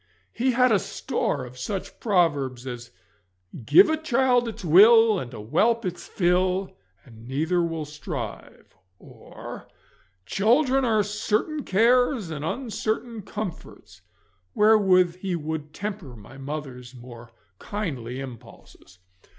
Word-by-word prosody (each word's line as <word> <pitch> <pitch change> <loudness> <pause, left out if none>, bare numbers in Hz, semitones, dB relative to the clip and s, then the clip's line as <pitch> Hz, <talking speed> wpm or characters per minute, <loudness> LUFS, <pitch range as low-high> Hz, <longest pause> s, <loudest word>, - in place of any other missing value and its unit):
He 255 +2 0
bad 250 0 +4
a 205 - +4
store 140 -6 -3
of 125 +1 -12
such 190 +9 -5
proverbs 145 - 0
as 120 -2 -7 0.7
'Give 145 +8 +7
a 315 0 0
child 255 -5 +2
its 220 -3 -7
will 215 +5 +6
and 120 -2 -7
a 120 - -9
whelp 210 - +1
its 180 -1 -5
fill, 185 +1 0 0.3
and 115 -2 -15
neither 160 +7 0
will 165 -2 -3
strive,' 150 - -8 0.2
or - - -11 0.6
'Children 255 +6 +2
are 215 -3 +2
certain 215 +8 -2
cares 235 - +2
and 150 -2 -5
uncertain 225 - -3
comforts,' 205 -2 -8 0.5
wherewith 190 -5 +4
he 185 -1 -3
would 155 -1 -5
temper 195 - -6
my 110 +4 -14
mother's 135 -3 -7
more 120 -1 -12 0.3
kindly 135 - -5
impulses. 120 -7 -12
180 Hz, 120 wpm, -25 LUFS, 135-220 Hz, 0.7 s, Give